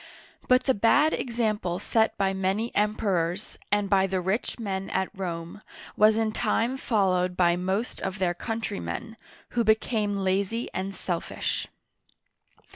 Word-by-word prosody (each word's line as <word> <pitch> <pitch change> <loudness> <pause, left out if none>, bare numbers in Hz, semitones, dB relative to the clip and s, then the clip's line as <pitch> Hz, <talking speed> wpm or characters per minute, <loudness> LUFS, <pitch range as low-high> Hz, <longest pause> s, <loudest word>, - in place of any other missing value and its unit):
But 255 0 +5
the 265 - +3
bad 285 +9 +4
example 215 -7 -1
set 220 +3 +1
by 195 -1 +1
many 195 +5 -1
Emperors, 200 -3 0
and 205 -1 +2
by 195 0 +3
the 190 0 -1
rich 190 +6 -1
men 195 -4 -3
at 190 0 -1
Rome, 175 0 -5 0.3
was 215 +1 +5
in 220 -1 +1
time 230 +3 0
followed 185 -7 +1
by 175 -1 +4
most 190 +6 -2
of 190 0 -3
their 180 -2 +1
countrymen, 225 +2 -4 0.3
who 235 - +1
becan^e 215 -1 +1
lazy 195 +4 0
and 190 +1 -3
selfish. 175 -2 -2
200 Hz, 135 wpm, -27 LUFS, 190-225 Hz, 0.3 s, But